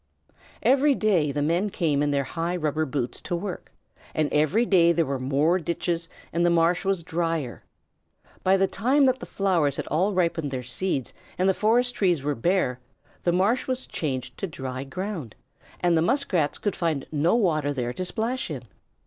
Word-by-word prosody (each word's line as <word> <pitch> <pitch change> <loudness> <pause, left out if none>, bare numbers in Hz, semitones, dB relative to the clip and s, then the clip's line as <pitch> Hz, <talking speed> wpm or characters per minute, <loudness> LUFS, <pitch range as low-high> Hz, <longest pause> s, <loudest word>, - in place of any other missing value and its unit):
Every 275 +2 +4
day 180 -11 +2
the 145 +1 -1
men 175 +7 +1
came 155 -7 0
in 145 - +1
their 140 -1 +1
high 165 +6 -3
rubber 155 -2 -1
boots 130 -3 -3
to 175 - -3
work, 185 +1 -5 0.4
and 155 -1 0
every 155 +11 +3
day 170 -6 +5
there 165 -1 +2
were 135 -2 -2
more 145 +7 +2
ditches 170 0 -2 0.2
and 170 - +1
the 175 - +4
marsh 170 +1 +3
was 195 -3 0
drier. 165 -6 -2 0.8
By 190 +1 +4
the 195 - +3
time 260 +9 +2
that 260 0 +2
the - - -8
flowers 170 -8 +1
had - - -4
all 185 +7 +1
ripened 170 -4 0
their 130 -2 -4
seeds 135 +2 -1 0.2
and 185 - +2
the 190 - +4
forest 240 +5 +2
trees 175 -8 +1
were 145 +1 0
bare, 130 -2 0 0.4
the 175 - +1
marsh 195 +8 +1
was 255 0 -2
changed 130 -5 -4
to 195 - -2
dry 130 -4 -5
ground, 175 - -5 0.5
and 175 -1 +3
the 160 - +3
Muskrats 180 - +1
could 205 - -2
find 160 -6 -1
no 160 +6 +2
water 155 -10 +1
there 125 -3 -2
to 185 - -4
splash 230 +6 -2
in. 135 -6 -5
170 Hz, 185 wpm, -25 LUFS, 145-195 Hz, 0.8 s, day